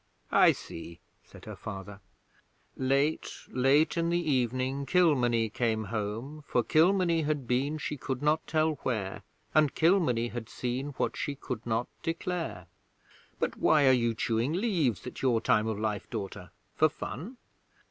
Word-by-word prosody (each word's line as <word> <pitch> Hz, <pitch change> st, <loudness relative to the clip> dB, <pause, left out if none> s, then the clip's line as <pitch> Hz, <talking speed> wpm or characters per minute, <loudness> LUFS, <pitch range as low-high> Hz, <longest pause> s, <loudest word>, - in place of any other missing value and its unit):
'I -, -, +6 dB
see,' 85 Hz, +1 st, -9 dB, 0.2 s
said -, -, -15 dB
her -, -, -7 dB
father. 100 Hz, 0 st, -8 dB, 0.8 s
'Late 140 Hz, +4 st, +1 dB, 0.2 s
late 135 Hz, +5 st, +3 dB
in 170 Hz, 0 st, +1 dB
the 175 Hz, 0 st, +2 dB
evening 130 Hz, -2 st, 0 dB
Kilmeny 125 Hz, -11 st, +3 dB
came 110 Hz, 0 st, 0 dB
home, 115 Hz, +8 st, -4 dB
For 120 Hz, -, +1 dB
Kilmeny 170 Hz, -, +3 dB
had 150 Hz, -3 st, -1 dB
been 135 Hz, +5 st, 0 dB
she 150 Hz, -1 st, -4 dB
could 130 Hz, 0 st, -4 dB
not 150 Hz, +1 st, +2 dB
tell 155 Hz, 0 st, +2 dB
where, 105 Hz, -7 st, -2 dB, 0.3 s
And 155 Hz, -2 st, +3 dB
Kilmeny 160 Hz, -10 st, +3 dB
had 115 Hz, -2 st, -6 dB
seen 130 Hz, +3 st, -3 dB
what -, -, -1 dB
she 145 Hz, -, -3 dB
could 125 Hz, -4 st, -6 dB
not 115 Hz, +1 st, 0 dB
declare. 165 Hz, -, -3 dB, 0.7 s
But -, -, -2 dB
why 150 Hz, -2 st, +4 dB
are -, -, +7 dB
you 120 Hz, -3 st, +2 dB
chewing 115 Hz, +6 st, 0 dB
leaves 170 Hz, -, 0 dB
at 125 Hz, -, -7 dB
your 125 Hz, -4 st, +3 dB
time 110 Hz, 0 st, +2 dB
of 110 Hz, -2 st, -2 dB
life, 105 Hz, -1 st, -2 dB
daughter? 100 Hz, -5 st, -6 dB, 0.3 s
For -, -, +4 dB
fun?' 185 Hz, -, -7 dB
130 Hz, 150 wpm, -29 LUFS, 115-155 Hz, 0.8 s, are